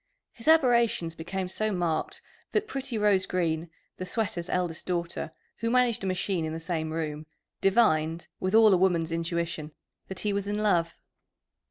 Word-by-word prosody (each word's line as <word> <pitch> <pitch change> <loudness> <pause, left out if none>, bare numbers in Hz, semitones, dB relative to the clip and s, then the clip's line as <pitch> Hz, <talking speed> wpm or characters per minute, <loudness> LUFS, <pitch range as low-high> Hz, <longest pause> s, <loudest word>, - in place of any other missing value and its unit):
His 230 - -12
aberrations 235 - +4
became 180 +3 -4
so 215 +4 -1
marked 175 -4 -2 0.3
that 425 0 +1
pretty 270 - -3
Rose 205 -3 +3
Green, 165 -2 -1 0.3
the 185 - -4
sweater's 185 -4 -2
eldest 175 -3 -2
daughter, 170 -2 -2 0.3
who 230 - -1
managed 240 -2 +2
a - - -1
machine 185 -1 -1
in 160 0 -3
the 165 - -4
same 160 -1 -2
room, 155 -1 -4 0.3
divined, 165 -6 +2
with 185 +3 0
all 220 -2 +7
a - - +5
woman's 175 -3 +2
intuition, 165 -2 -2 0.3
that 190 -1 -4
he 210 -1 0
was 200 0 -2
in 205 0 -1
love. 175 -6 +1
185 Hz, 165 wpm, -28 LUFS, 165-210 Hz, 0.3 s, all